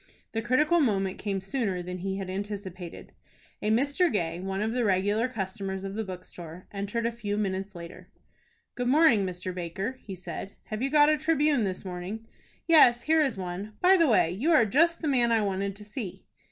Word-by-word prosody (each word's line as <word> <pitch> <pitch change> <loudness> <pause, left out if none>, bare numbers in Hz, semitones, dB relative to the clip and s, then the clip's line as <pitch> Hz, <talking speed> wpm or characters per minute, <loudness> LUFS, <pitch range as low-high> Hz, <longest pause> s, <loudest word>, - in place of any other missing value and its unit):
The 225 - -2
critical 300 +9 +3
moment 195 - +1
came 200 -2 -2
sooner 195 -3 -2
than 180 +1 -6
he 190 +1 -3
had 195 -1 -4
anticipated. 190 -2 -6 0.5
A 210 - 0
Mr. 285 +10 +2
Gay, 170 -5 -1
one 190 +1 -3
of 220 +2 -1
the 250 -1 0
regular 205 +3 +2
customers 195 -4 -4
of 195 0 -5
the 220 +2 -2
bookstore, 180 -2 -9
entered 205 +3 -3
a 235 - +1
few 210 -3 -3
minutes 195 -1 -2
later. 170 +1 -10 0.6
"Good 245 0 -2
morning, 255 -8 +5
Mr. 185 0 -5
Baker," 190 +8 -4
he 195 - -7
said. 185 +2 -7
"Have 215 +1 -5
you 270 - 0
got 295 0 +6
a 305 - +3
'Tribune' 300 -6 +2
this 190 0 -4
morning?" 185 +5 -6 0.4
"Yes, 245 -8 +6
here 320 +1 +3
is 270 -8 0
one. 190 +3 -5
By 370 +1 +6
the 335 -4 +4
way, 210 -9 +4
you 245 - 0
are 245 -8 +6
just 330 - +2
the - - 0
man 245 -4 +3
I 225 -2 +3
wanted 195 0 -2
to 210 - -12
see." 210 -3 -7
205 Hz, 195 wpm, -28 LUFS, 190-250 Hz, 0.6 s, got